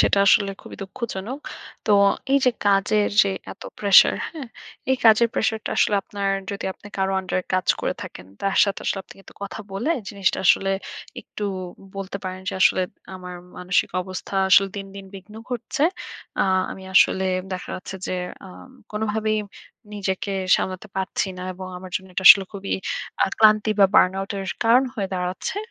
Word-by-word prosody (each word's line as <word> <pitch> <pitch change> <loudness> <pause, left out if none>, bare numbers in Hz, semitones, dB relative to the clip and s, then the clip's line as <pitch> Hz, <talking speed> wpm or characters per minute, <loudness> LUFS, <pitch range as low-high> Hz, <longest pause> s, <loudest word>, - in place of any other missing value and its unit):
সেটা - - +4
আসলে 200 0 +5
খুবই - - -11
দুঃখজনক। 220 +3 -5 0.5
তো - - +1 0.4
এইযে 270 -2 +4 0.2
কাজের 205 +1 +3
যে 200 - 0 0.2
এতো - - -11
pressure 200 -2 +6
হ্যাঁ? 300 -6 -8 0.4
এই 265 - +4
কাজের 225 +1 +6
প্রেশারটা 220 -1 -1
আসলে 210 - +3
আপনার, 200 0 -3 0.2
যদি 200 - -5
আপনি 205 - -16
কারো 190 0 0
under 185 -1 -3
এ - - -38
কাজ 185 -1 0
করে - - -1
থাকেন, 90 - -10
তার 195 0 -1
সাথে 200 -1 -3
আসলে 195 - -1
আপনি - - -14
কিন্তু - - -17
কথা 200 +2 -6
বলে 230 +11 -1 0.2
জিনিসটা 195 -3 0
আসলে 195 +2 +4 0.5
একটু 210 - -7 0.5
বলতে 195 0 -5
পারেন 185 0 -5
যে - - -1
"আসলে 185 - +4 0.3
আমার 180 -1 -8 0.2
মানসিক 180 0 +1
অবস্থা 185 +1 -7
আসলে 195 +1 +6
দিন 195 -1 -5
দিন 195 - -8
বিঘ্ন 195 +2 -12 0.2
ঘটছে। 250 +4 -3 0.6
আ - - +5 0.3
আমি 190 - -8
আসলে 190 0 +5 0.3
দেখা 185 - -5
যাচ্ছে 185 - -7
যে - - -3 0.3
আ - - -11 0.4
কোনোভাবেই 215 0 -1 0.6
নিজেকে 195 0 -2 0.2
সামলাতে 185 +3 -4
পারছি 190 +1 -1
না, - - -6
এবং 185 +1 -8
আমার 185 0 -10
জন্য 190 - -9
এটা 190 - -2
আসলে 195 - +10
খুবই 200 -1 -5 0.5
আ - - -1
ক্লান্তি 215 0 +5
বা 195 - +8
burnout 195 +1 +3
এর 195 - -4 0.2
কারণ 245 +4 +5
হয়ে 200 -4 -2
দাঁড়াচ্ছে।" 180 - -3
195 Hz, 170 wpm, -23 LUFS, 190-215 Hz, 0.6 s, আসলে